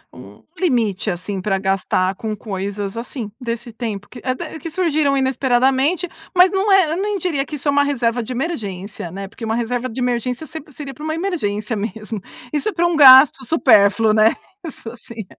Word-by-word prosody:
um - - -14 0.2
limite, 230 - 0
assim, 190 +2 -4
para 195 0 0
gastar 190 -1 0
com 215 +2 -4
coisas, 200 0 -5
assim, 230 -2 -5
desse 235 -1 -5
tempo 215 -4 -5
que 245 - -12
é 255 -1 -1
d 315 - -7
que 330 - -6
surgiram 310 -5 +1
inesperadamente. 265 +5 +1 0.3
Mas 360 0 +6
não 390 +1 +1
é 385 -2 +6
eu 340 +4 -1
nem 415 0 -1
diria 330 -7 -1
que 305 - -6
isso 290 0 -5
é - - +4
uma 285 0 +3
reserva 245 -4 0
de 230 - -7
emergência, 210 - -4
né, 195 +2 -6
porque 220 - -13
uma 220 0 -1
reserva 240 +2 -2
de 225 - -7
emergência 250 +3 -2
sep 310 -1 -9
seria 275 0 -8
para 295 - -11
uma 315 0 -2
emergência 230 - -2
mesmo. 215 0 -5 0.3
Isso 295 +6 +1
é - - -6
para 345 - +1
um 345 -1 +1
gasto 265 -1 +8
supérfluo, 220 -6 +4
né, 215 +1 +4 0.3
isso 245 -8 -8
sim. 230 -2 -9
245 Hz, 195 wpm, -19 LUFS, 215-300 Hz, 0.3 s, gasto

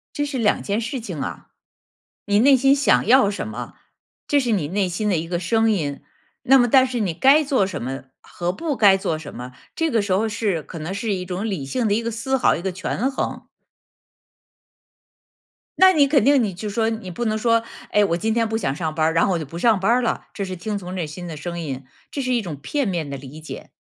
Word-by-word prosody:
这 290 - -1
是 285 -2 -4
2 225 -3 +2
件 205 +2 -1
事 235 +3 -4
情 185 -10 -6
啊。 135 - -6 0.8
你 205 0 +2
内 270 +4 +6
心 270 +2 +4
想 285 0 +3
要 250 -3 +6
什 200 - -4
么， 120 +3 -7 0.5
这 290 - +3
是 250 -4 0
你 175 -9 0
内 195 +1 0
心 180 +4 -2
的 185 - +2
一 160 +1 -3
个 175 0 -2
声 225 +5 +2
音， 150 -9 -2 0.4
那 270 +2 +6
么 245 -2 +4
但 260 +2 +5
是 250 -1 -3
你 195 -6 -1
该 275 - +5
做 270 -8 +2
什 170 -7 -5
么 135 +3 -5 0.2
和 175 0 -4
不 300 - -3
该 205 -4 +5
做 165 -4 -2
什 155 -2 -9
么， 125 +1 -8 0.2
这 325 0 0
个 230 -6 +2
时 200 -1 -4
候 210 +4 +1
是 205 -6 -1
可 165 - -9
能 160 +4 -4
是 205 +2 -2
一 180 -1 -3
种 185 +3 -4
理 170 -9 -3
性 230 - -1
的 205 - +2
一 220 - +1
个 230 0 -3
思 230 +4 -1
考， 250 - +3
一 165 - -5
个 190 +1 -2
权 190 +7 -2
衡。 270 - -4 2.3
那 375 0 +7
你 295 -5 +4
肯 275 -5 +3
定 280 -1 +5
你 210 -4 -1
就 190 +4 -6
说 220 +2 0
你 220 -5 -5
不 240 +7 -4
能 215 -1 0
说， 230 0 +2 0.3
哎， 210 - +4
我 170 -4 0
今 220 +5 -1
天 230 -1 +1
不 220 0 -1
想 135 -11 -1
上 160 -1 -3
班 155 -1 +1
儿， 160 - 0
然 165 - +3
后 195 - +1
我 - - 0
就 155 - -5
不 165 +5 -8
上 220 0 +3
班 195 +4 +2
儿 250 +2 +3
了， 235 - -2
这 200 - -3
是 185 -1 -5
听 205 +4 -4
从 180 -1 -7
内 175 -4 -2
心 175 +4 -8
的 165 -3 -6
声 170 +3 -5
音， 135 -5 -5 0.3
这 285 - -4
是 255 -1 0
一 235 - +1
种 170 -7 -6
片 275 - -2
面 170 -6 -2
的 140 - -5
理 140 +3 -10
解。 155 - -9
205 Hz, 265 characters per minute, -22 LUFS, 170-235 Hz, 2.3 s, 那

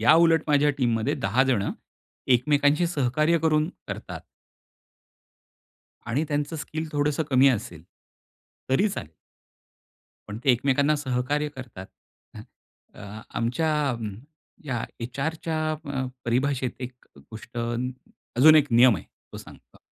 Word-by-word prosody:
याउलट 160 +6 +5
माझ्या 145 0 +3
टीममध्ये 115 -3 +1
10 105 +7 +1
जण 105 -5 +1 0.6
एकमेकांशी 145 +5 +3
सहकार्य 155 +2 +1
करून, 155 0 +2 0.2
करतात. - - -6 1.9
आणि 130 +7 0
त्यांचं 145 +2 -2
स्किल 155 +1 -5
थोडंसं 145 +1 0
कमी 130 +1 +5
असेल. 85 -9 -3 0.9
तरी 165 +11 +3
चालेल. 85 - -6 1.2
पण 105 - -6
ते 135 - +5
एकमेकांना 140 +4 +2
सहकार्य 145 +2 -1
करतात. 115 -8 -9 0.5
ह, - - -8 0.5
अ, 105 +1 -10
आमच्या 125 +8 -1 0.2
अ, 120 - -2 0.7
या 120 -4 -2 0.2
एचआरच्या 155 +6 -3
अ, 140 -4 -4 0.2
परिभाषेत 130 +1 -1
एक 125 0 -5 0.2
गोष्ट 110 - -12 0.8
अजून 155 +4 +8
एक 145 -1 +5
नियम 120 0 +6
आहे 85 - -8 0.3
तो - - -8
सांगतो. - - -15
140 Hz, 115 wpm, -25 LUFS, 120-150 Hz, 1.9 s, अजून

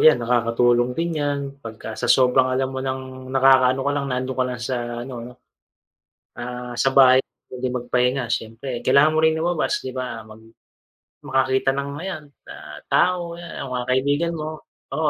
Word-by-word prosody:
yan 155 -3 +7
nakakatulong 120 +1 +2
din 165 -2 -1
yan 145 -1 0 0.2
pagka 110 -2 -8
sa 120 +2 -4
sobrang 130 +1 +4
alam 130 +1 -1
mo 130 - -4
ng 130 -1 -5
nakakaano 130 -1 +5
ka 145 - +1
lang, 140 -1 -2
nandoon 130 0 -2
ka - - +3
lang 125 -1 -5
sa 130 - -1 0.3
ano 130 0 -8
'no. 120 +1 -9 1.1
Ah, 125 0 -6
sa 135 - +3
bahay 130 -1 +7 0.3
puwede 130 0 -3
magpahinga 125 0 0
siyempre. 115 +4 -4
Kailangan 140 +5 +4
mo 155 - +1
rin 160 0 +3
lumabas 165 0 -1
'di 130 - -5
ba, 125 -3 -5
mag 110 0 -14 0.9
makakita 130 0 +1
ng 140 +1 -3
ayan 175 -1 -5 0.2
na - - -10 0.3
tao, 175 -2 +1
ayan 170 -4 -7
mga 125 -2 -3
kaibigan 145 +6 +1
mo, 155 0 -6 0.3
oo 155 +1 +1
130 Hz, 165 wpm, -22 LUFS, 125-145 Hz, 1.1 s, yan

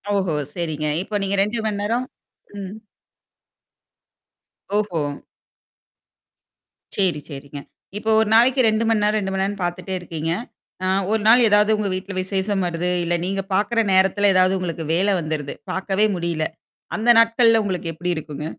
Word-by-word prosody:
ஓஹோ! 185 -5 0 0.2
சரிங்க. 155 -3 -2 0.2
இப்ப 205 +1 -3
நீங்க 195 +1 0
2 215 +3 -2
மணி 205 -2 -1
நேரம் 235 +4 -1 0.5
ம். 195 +1 -7 2.0
ஓஹோ! 205 -7 0 1.9
சேரி, 180 -7 +1
சேரிங்க. 140 0 -8 0.4
இப்ப 220 +1 -3
ஒரு 220 - +2
நாளைக்கு 255 +3 +5
2 220 +1 +1
மணி 220 -2 +2
நேரம், 210 +1 +2
2 190 -1 -3
மணி 190 - -1
நேரம்னு 200 -1 -3
பார்த்துட்டே 175 +2 -4
இருக்கீங்க. 165 -2 -4 0.5
ஆ - - +1 0.2
ஒரு 220 -1 +1
நாள் 240 +3 +7
ஏதாவது 210 +1 +4
உங்க 210 -1 -1
வீட்ல 185 +1 -5
விசேஷம் 195 +1 -1
வருது, 175 +1 -2
இல்ல 175 0 0
நீங்க 195 +1 -1
பார்க்கற 215 +4 +1
நேரத்தல 195 +2 +3
ஏதாவது 185 +1 +3
உங்களுக்கு 170 -2 -4
வேல 195 +3 +2
வந்துருது. 155 -3 -4 0.2
பார்க்கவே 195 +2 +1
முடியல. 170 -2 -2 0.5
அந்த 230 +3 0
நாட்கள்ல 230 -1 +4
உங்களுக்கு 180 -4 -3
எப்படி 175 +3 -4
இருக்குங்க? 150 -1 -6
190 Hz, 145 wpm, -21 LUFS, 170-210 Hz, 2.0 s, நாள்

